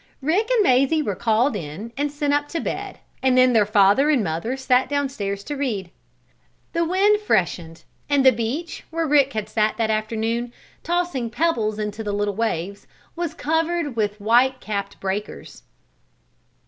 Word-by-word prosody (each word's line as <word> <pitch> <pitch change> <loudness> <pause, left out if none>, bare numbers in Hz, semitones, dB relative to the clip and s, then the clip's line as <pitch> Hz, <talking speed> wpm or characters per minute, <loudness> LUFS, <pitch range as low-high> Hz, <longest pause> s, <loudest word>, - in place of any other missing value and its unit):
Rick 380 - +1
and 485 -4 +3
Mazie 275 +1 +3
were 205 - -2
called 235 +4 +1
in 195 +6 -7
and 290 +1 -1
sent 290 0 -1
up 290 0 +1
to 330 - -3
bed, - - -4 0.2
and 260 -1 +3
then 255 0 +5
their 215 -3 +4
father 210 +7 +4
and 275 -7 +3
mother 185 +10 -2
sat 260 -1 +2
down 285 -1 0
stairs 200 -5 -4
to 295 - -5
read. 215 -11 -3 0.8
The 335 0 +1
wind 390 +5 +3
freshened 175 - -1 0.3
and 280 -2 +3
the 260 - +9
beach, 255 +9 -4
where 330 0 -1
Rick 280 -2 +3
had 215 -1 -3
sat 215 0 0
that 225 -1 +1
afternoon, 225 +2 -2 0.3
tossing 345 -9 -1
pebbles 225 -6 0
into 210 +1 -4
the 205 -1 -3
little 205 0 -1
waves, 200 -3 -3 0.3
was 335 -1 -3
covered 320 -3 -1
with 210 -1 -1
white 245 +5 +3
capped 200 -2 -5
breakers. 195 +2 -5
240 Hz, 165 wpm, -22 LUFS, 210-290 Hz, 0.8 s, the